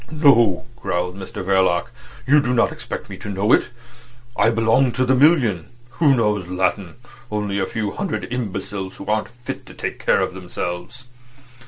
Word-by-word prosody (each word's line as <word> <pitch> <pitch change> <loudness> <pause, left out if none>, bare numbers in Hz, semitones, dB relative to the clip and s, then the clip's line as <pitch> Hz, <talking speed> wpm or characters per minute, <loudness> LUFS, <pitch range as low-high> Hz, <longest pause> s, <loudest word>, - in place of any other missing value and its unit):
"No," 130 - +4
growled 90 -5 -2
Mr 95 -1 -7
Verloc. 95 -2 +2 0.3
"You 145 +3 +5
did 125 -2 0
not 115 - +3
expect - - -7
me - - -8
to 105 - -8
know 100 +3 +1
it. - - +3 0.7
I 105 +3 +4
belong 115 +3 +3
to 130 +1 +1
the 130 - +3
million. 130 - +3 0.3
Who 145 -5 +5
knows 105 -6 0
Latin? 95 0 -1 0.3
Only 105 -1 -2
a 95 - 0
few 105 -3 -3
hundred 200 - -3
imbeciles 100 -4 -4
who - - -9
aren't 105 0 0
fit 120 +1 -8
to - - -12
take - - -4
care - - +3
of - - -1
themselves." 90 +6 -6
105 Hz, 170 wpm, -21 LUFS, 95-125 Hz, 0.7 s, You